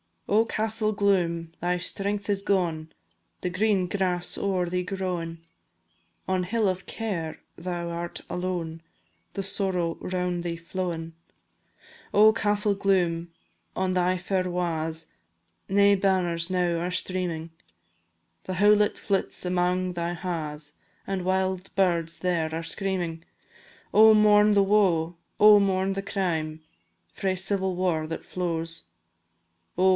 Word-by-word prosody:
Oh, 220 +3 +3
Castell 220 -1 0
Gloom! 175 -5 +1
thy 180 +1 0
strength 200 +3 -2
is 200 -1 +1
gone, 170 -6 0 0.5
The 180 - -1
green 195 0 +2
grass 180 -2 0
o'er 190 -3 0
thee 180 +1 -1
growin'; 180 -3 -4 0.8
On 185 -1 +1
hill 210 +2 +1
of 185 0 -3
Care 180 -8 -4 0.2
thou 175 0 -4
art 170 0 -4
alone, 175 -3 -3 0.5
The 195 - -3
Sorrow 185 -4 0
round 180 -1 -2
thee 170 -1 -2
flowin'. 170 -1 -4 1.0
Oh, 215 +1 +7
Castell 210 -1 +2
Gloom! 175 -4 +1 0.4
on 185 0 0
thy 180 0 +2
fair 185 0 -1
wa's 165 -2 -2 0.6
Nae 200 +1 +5
banners 180 -3 +1
now 175 -2 +1
are 175 +2 -2
streamin', 180 -3 -2 0.9
The 185 - -4
houlet 210 +2 +4
flits 195 -2 -1
amang 180 0 0
thy 170 0 -2
ha's, 155 -4 -5 0.3
And 190 -2 -3
wild 190 0 -1
birds 170 -4 +1
there 165 -3 0
are 165 - -3
screamin'. 175 -3 -3 0.7
Oh! 220 +1 +8
mourn 210 0 +5
the 200 -1 +5
woe, 180 -5 +2 0.2
oh! 210 0 +9
mourn 190 -1 +1
the 195 - -3
crime, 165 -6 -2 0.5
Frae 190 -1 -1
civil 190 0 0
war 175 -4 0
that 165 0 -5
flows; 165 - -3 0.9
Oh! - - 0
180 Hz, 125 wpm, -26 LUFS, 170-195 Hz, 1.0 s, oh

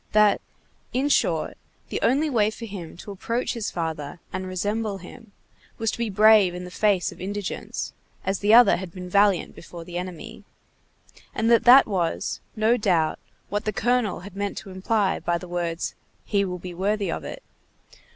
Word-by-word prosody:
that, 210 -1 +5 0.5
in 265 +3 +1
short, 290 - +1 0.3
the - - -3
only 280 +6 +3
way 220 -7 +2
for 230 +1 -8
him 185 -7 -8
to 200 - -9
approach 230 +5 -2
his 230 -3 -3
father 160 -2 -4
and 185 0 -3
resemble 205 +3 -2
him, 205 +4 -13 0.5
was 225 -1 0
to - - -6
be 235 -2 0
brave 210 -2 +6
in 180 - -6
the 180 - -8
face 200 -2 +2
of - - -13
indigence, 200 +1 -4 0.3
as 190 +1 0
the 205 +1 +2
other 240 +2 +8
had 185 -1 -7
been 180 0 -8
valiant 200 -1 +3
before 170 0 -10
the 175 0 -4
enemy; 180 -2 -8 0.9
and 225 +1 +2
that 235 - +5
that 255 +3 +9
was, 180 -6 -1 0.2
no 220 +2 +3
doubt, 175 -8 +1 0.3
what 205 +1 -1
the 215 - +1
colonel 220 -3 0
had 195 +1 -11
meant 200 0 -3
to 195 - -7
imply 195 +2 0
by 175 0 0
the 180 - -9
words: 175 -1 -2 0.3
"He 200 -1 +1
will 180 -1 -4
be 180 0 -8
worthy 200 +3 0
of - - -4
it." - - -7
200 Hz, 180 wpm, -25 LUFS, 180-220 Hz, 0.9 s, that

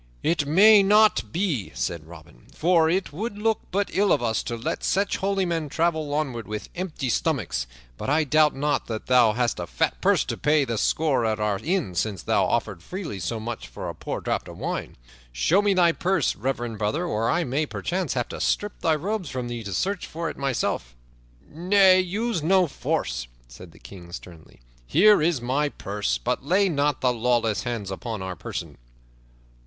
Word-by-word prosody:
"It 150 -4 +1
may 205 +7 +7
not 210 +2 +4
be," 160 - -1
said 85 -3 -3
Robin, 80 -7 -15
"for 165 -1 +3
it 185 -2 -1
would 205 +6 -4
look 220 +1 +1
but 200 +2 -1
ill 200 +1 +2
of - - +2
us 115 -1 0
to 120 - -3
let 115 - -4
such 200 +1 +1
holy 195 -1 0
men 165 -4 -2
travel 160 -1 0
onward 130 -7 -2
with 105 0 -5
empty 170 -7 -4
stomachs. 125 - -1 0.3
But - - -4
I 155 +3 +3
doubt 150 0 +3
not 145 +2 -1
that 110 -2 -5
thou 125 -4 +5
hast 120 -3 0
a 85 - -4
fat - - -1
purse - - +3
to - - -4
pay 150 -1 +2
thy 115 -3 -3
score 145 +2 +1
at 110 -1 0
our 105 -2 0
inn 160 - -1
since 95 -1 -2
thou - - +2
offerest 105 -6 -1
freely 165 - -6
so 95 +6 -3
much 115 +1 -6
for - - -6
a - - -5
poor - - -5
draught - - -2
of - - -10
wine. - - -4 0.3
Show 150 - +2
me 205 -1 +2
thy 175 -2 +5
purse, 180 -2 0
reverend 120 -2 -3
brother, 125 +12 -1
or 115 -8 0
I 175 - +2
may 150 +2 -1
perchance 180 -4 -2
have 120 -2 -1
to - - -6
strip 205 0 -1
thy 160 -1 +2
robes 185 +1 -3
from 125 -2 -4
thee 120 -1 -5
to 100 - -5
search 190 - -1
for 165 0 -4
it - - -12
myself." 125 - -2 0.5
"Nay, 185 +3 +4
use 200 +2 -1
no 185 +4 +4
force," 65 - -2 0.2
said - - -13
the - - -18
King 90 -3 -12
sternly. 85 -6 -11 0.3
"Here 205 +2 +5
is 160 -5 +1
my 140 +4 0
purse, 100 -5 -2
but 125 +1 -2
lay 190 +7 +3
not 145 -3 0
thy 125 - +3
lawless 115 -3 0
hands 115 -5 -3
upon 110 +1 -5
our 95 -1 -5
person." - - -7
145 Hz, 195 wpm, -25 LUFS, 110-180 Hz, 0.5 s, may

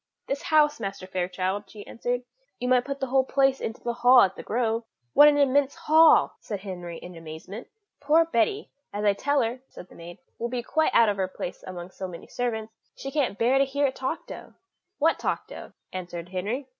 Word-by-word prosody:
"This 275 +1 -3
house, 300 -1 +3
Master 195 -3 -5
Fairchild," 185 +2 -3
she 205 -2 -11
answered; 245 +1 -3 0.4
"you 250 - -2
might 250 -1 +3
put 275 0 -4
the 270 - -1
whole 265 +1 +2
place 270 0 +2
into 225 - -5
the 240 - -1
hall 245 +1 +6
at 190 -1 +2
The - - -7
Grove." 230 0 -1 0.3
"What 295 - +8
an 295 -1 +5
immense 280 0 +3
hall!" 320 +1 +5
said 205 -3 -6
Henry 175 -4 -7
in 180 +1 -10
amazement. 165 +7 -9 0.3
"Poor 310 +3 +4
Betty, 325 - 0 0.2
as 205 +1 -3
I 205 - +5
tell 285 +5 +1
her," 235 +3 -3
said 180 - -12
the - - -16
maid, 170 +1 -10 0.2
"will 235 - -2
be 245 -1 -3
quite 315 +5 +1
out 230 -2 +6
of 200 - -1
her 190 -1 0
place 180 -1 -7
amongst 180 0 -9
so 190 - -3
many 170 -2 -10
servants; 225 -3 -3 0.2
she 275 - -6
can't 275 -8 0
bear 250 +4 +3
to - - +5
hear 280 +1 0
it 265 - -1
talked 265 +5 -4
of." - - -10 0.4
"What 325 +3 +2
talked - - -3
of?" - - -9 0.2
answered 175 -2 -6
Henry. 210 +9 -3
235 Hz, 210 wpm, -26 LUFS, 190-275 Hz, 0.4 s, What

